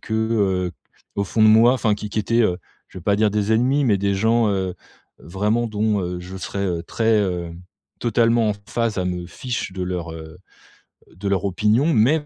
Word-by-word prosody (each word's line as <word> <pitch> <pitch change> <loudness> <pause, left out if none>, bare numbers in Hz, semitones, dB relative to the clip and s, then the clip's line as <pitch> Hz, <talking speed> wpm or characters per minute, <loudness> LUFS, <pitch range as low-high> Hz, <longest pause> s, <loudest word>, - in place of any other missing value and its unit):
que, 110 - -5
heu, 100 -5 0 0.4
au 100 - 0
fond 110 +3 0
de 110 - +7
moi 115 +3 +6
enfin 110 -4 +1
qui 105 - -9
qui - - -18
qui - - -2
était, 115 +3 +1
heu, 90 -4 +1 0.3
je - - -10
vais - - -12
pas 100 +1 +2
dire 105 -1 +2
des 105 +1 0
ennemis, 130 +5 +2
mais 105 -5 +2
des 100 0 0
gens, 110 +2 +2
heu, 95 -2 -1 0.4
vraiment 105 +7 -1
dont, 105 -1 0
heu, 90 -1 -4
je 90 +2 -9
serai, 95 +1 -5
heu, 85 -2 -2
très, 110 +5 +1
heu 90 -3 -2 0.5
totalement 115 -1 +2
en - - +1
phase 115 -2 -1
à 90 - 0
me 90 -1 -3
fiche 120 -1 -5
de 95 -1 -4
leur, 90 -2 -3
heu, 80 +1 -10 0.8
de 100 +3 -6
leur 100 0 0
opinion. 110 - +2
Mais, 140 +7 +3
105 Hz, 210 wpm, -21 LUFS, 90-115 Hz, 0.8 s, de